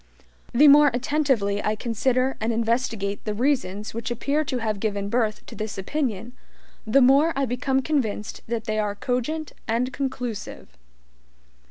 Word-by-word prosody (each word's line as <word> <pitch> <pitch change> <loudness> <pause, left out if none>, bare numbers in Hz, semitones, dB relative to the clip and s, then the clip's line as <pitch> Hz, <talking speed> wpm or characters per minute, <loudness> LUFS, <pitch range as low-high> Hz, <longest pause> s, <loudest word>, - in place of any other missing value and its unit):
The 285 +5 +6
more 290 +1 +8
attentively 250 -7 0
I 215 - 0
consider 255 +4 0
and 225 +2 0
investigate 225 -3 -1
the 210 -1 -3
reasons 220 -5 -1
which 230 +3 -4
appear 280 +6 0
to 265 -3 -3
have 215 -3 -2
given 200 -1 -2
birth 220 -2 0
to - - -11
this 215 -2 -5
opinion, 235 0 -3 0.5
the 270 +6 +5
more 280 +6 +5
I 275 0 +1
become 260 +2 0
convinced 225 -9 -2
that 230 -1 -2
they 215 -2 -1
are 205 -1 -1
cogent 255 +8 -2 0.2
and 240 +3 0
conclusive. 245 - -5
240 Hz, 150 wpm, -24 LUFS, 215-270 Hz, 0.5 s, more